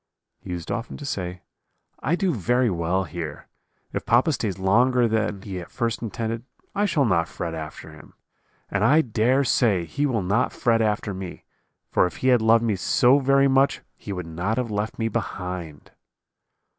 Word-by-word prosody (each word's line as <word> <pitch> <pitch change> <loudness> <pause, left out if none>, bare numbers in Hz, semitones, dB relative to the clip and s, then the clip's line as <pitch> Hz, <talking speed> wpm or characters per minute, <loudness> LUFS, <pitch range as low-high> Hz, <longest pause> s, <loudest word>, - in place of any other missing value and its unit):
"He - - -12
used 85 -2 -4
often 115 +1 -4
to 145 - -8
say, 90 -8 -4 0.6
'I 155 +6 +1
do 185 -1 0
very 120 +2 +1
well 90 +2 0
here; 80 -3 -6 0.5
if - - -2
papa 120 +7 +3
stays 105 -7 -2
longer 120 +6 +3
than 110 -3 -1
he 95 -3 -5
at 85 - -9
first 115 -2 -2
intended 115 0 -3 0.3
I 205 - +1
shall 155 -8 +2
not 85 -7 +2
fret 85 -1 -5
after 80 -1 -7
him, - - -15 0.6
and 100 0 0
I 150 +8 +5
dare 125 +2 +2
say 105 -9 +2
he 145 - -1
will 115 -7 0
not 100 +7 +1
fret 115 -2 +2
after 105 -1 0
me, 95 -1 -8 0.5
for - - +4
if - - -9
he - - +5
had 125 -3 +5
loved 115 +1 +4
me 110 -3 +1
so 130 - +4
very 135 0 +4
much 135 +1 +3
he 105 - -8
would 90 -3 -4
not 90 +7 -2
have 125 -3 -1
left 105 +1 -2
me 115 - 0
behind.' 90 -7 -5
110 Hz, 180 wpm, -24 LUFS, 90-125 Hz, 0.6 s, I